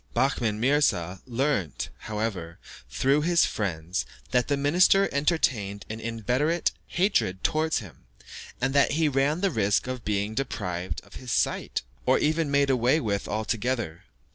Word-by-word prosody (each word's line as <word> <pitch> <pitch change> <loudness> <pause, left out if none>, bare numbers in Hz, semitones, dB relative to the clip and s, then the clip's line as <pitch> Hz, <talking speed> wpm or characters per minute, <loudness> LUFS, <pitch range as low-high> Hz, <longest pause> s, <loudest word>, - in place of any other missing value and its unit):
Behmen 120 -4 +1
Mirza 110 - +1
learnt, 125 - -1
however, 105 -6 -4 0.3
through 135 - +2
his 170 +2 +4
friends, 90 -3 -2 0.3
that 125 -2 +2
the 140 - +1
minister 180 +7 +4
entertained 130 - 0
an 110 - -5
inveterate 125 - 0 0.2
hatred 175 - 0
towards 160 +1 +1
him, 100 - -9 0.5
and 135 +2 0
that 140 +1 +4
he 160 +1 +2
ran 145 +4 +1
the 195 -2 +2
risk 105 -6 +1
of 130 -1 -5
being 105 +1 -1
deprived 95 -8 -3
of - - -13
his 125 -2 -7
sight, - - 0 0.2
or - - +5
even 155 0 +1
made 140 -1 +3
away 125 +4 +3
with 100 -6 -2
altogether. 110 -4 -2
125 Hz, 140 wpm, -26 LUFS, 100-145 Hz, 0.5 s, or